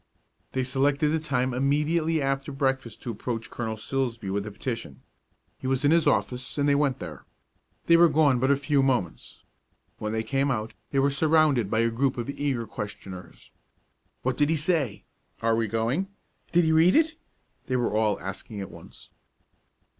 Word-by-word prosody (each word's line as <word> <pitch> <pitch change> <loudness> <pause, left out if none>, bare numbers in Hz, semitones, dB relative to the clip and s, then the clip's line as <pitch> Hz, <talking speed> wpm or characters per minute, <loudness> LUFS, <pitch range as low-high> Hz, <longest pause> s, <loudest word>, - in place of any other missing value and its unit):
They 130 - 0
selected 140 +3 +2
the 160 +1 +1
time 130 -4 -1
immediately 150 +4 +1
after 135 +1 -1
breakfast 135 -3 -2
to 120 - -3
approach 115 +1 -4
Colonel 110 -2 -4
Silsbee 115 -3 -2
with 100 +1 -1
the - - -4
petition. 115 - -5 0.6
He - - -5
was 135 +1 +1
in 145 - +5
his 165 0 +4
office, 125 +2 0
and 145 0 +2
they 145 - +4
went 140 -2 +2
there. 85 -3 -8 0.6
They 170 - +6
were 170 0 +7
gone 145 -4 +3
but 130 +2 +1
a 140 - +5
few 140 0 +1
moments. 125 - -2 0.6
When 105 - -3
they 110 0 -1
came 135 +3 0
out, 110 -4 -2 0.2
they 140 - -2
were 140 +1 +3
surrounded 150 -6 +3
by 110 +1 +2
a 115 0 +2
group 130 +3 0
of 120 +3 -3
eager 140 -5 -2
questioners. 100 -3 -8 0.7
"What 130 0 0
did 145 0 +3
he 165 - +3
say?" 150 - 0 0.4
"Are 115 0 +3
we 115 0 0
going?" 115 - 0 0.4
"Did 175 0 +4
he 160 - +2
read 160 +3 +5
it?" 320 +1 +4 0.5
They 130 - 0
were 120 -3 0
all 110 -2 +2
asking 95 +3 -7
at 95 - -6
once. - - -13
130 Hz, 180 wpm, -26 LUFS, 115-145 Hz, 0.7 s, were